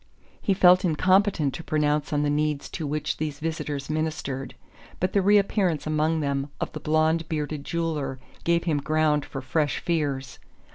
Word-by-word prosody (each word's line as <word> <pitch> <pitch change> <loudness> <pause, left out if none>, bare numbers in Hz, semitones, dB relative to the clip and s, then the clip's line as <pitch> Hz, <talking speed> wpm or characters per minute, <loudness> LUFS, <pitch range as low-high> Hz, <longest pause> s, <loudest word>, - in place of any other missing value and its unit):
He 195 - +1
felt 180 0 +6
incompetent 185 -3 +2
to 165 - -6
pronounce 150 -1 0
on 145 -1 +1
the 145 - +1
needs 150 -1 -1
to 155 - -4
which 150 +1 -2
these 150 -2 -3
visitors 150 -3 -3
ministered; 155 -4 -3 0.4
but 185 +1 0
the 200 - +4
reappearance 195 -4 +2
among 155 +1 +1
them 140 0 -1
of - - -3
the - - -6
blond 160 +1 +1
bearded 150 -2 -3
jeweller 155 -6 -2 0.3
gave 170 0 +2
him 155 -4 +1
ground 155 0 +1
for 135 - -6
fresh 145 +2 0
fears. 140 -5 -2
155 Hz, 160 wpm, -25 LUFS, 145-165 Hz, 0.4 s, felt